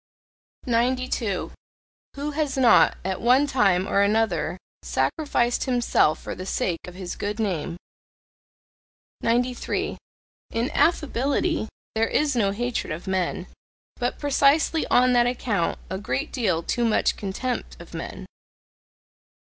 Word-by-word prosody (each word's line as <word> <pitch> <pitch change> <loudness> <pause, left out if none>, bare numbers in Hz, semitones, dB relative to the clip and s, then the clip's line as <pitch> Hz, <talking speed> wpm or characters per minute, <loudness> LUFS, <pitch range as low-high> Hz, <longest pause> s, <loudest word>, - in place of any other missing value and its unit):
92. 245 -4 0 0.6
Who 285 +2 -3
has 295 -2 -1
not, 250 -3 +5
at 190 -1 -2
one 255 +4 +5
time 195 -9 +2
or 200 - +2
another 200 -5 +1 0.2
sacrificed 265 -6 0
himself 245 - +2
for - - -6
the 185 - -7
sake 175 -3 -1
of 180 - -9
his 185 -1 -6
good 205 +2 -4
name? 175 -5 -2 1.4
93. 245 +2 -1 0.5
In 235 +5 -1
affability 295 -2 +1 0.3
there 225 +1 +1
is 295 -3 +1
no 210 -5 +2
hatred 240 +1 -2
of 155 +3 -5
men, 185 -1 -1 0.5
but 245 0 -2
precisely 290 +3 +2
on 250 0 +4
that 240 0 +4
account 225 -8 -1
a 190 +1 -4
great 130 -9 -2
deal 185 -9 0
too 240 - -1
much 225 -2 +2
contempt 215 +6 -4
of - - -12
men. - - -6
235 Hz, 125 wpm, -24 LUFS, 190-255 Hz, 1.4 s, not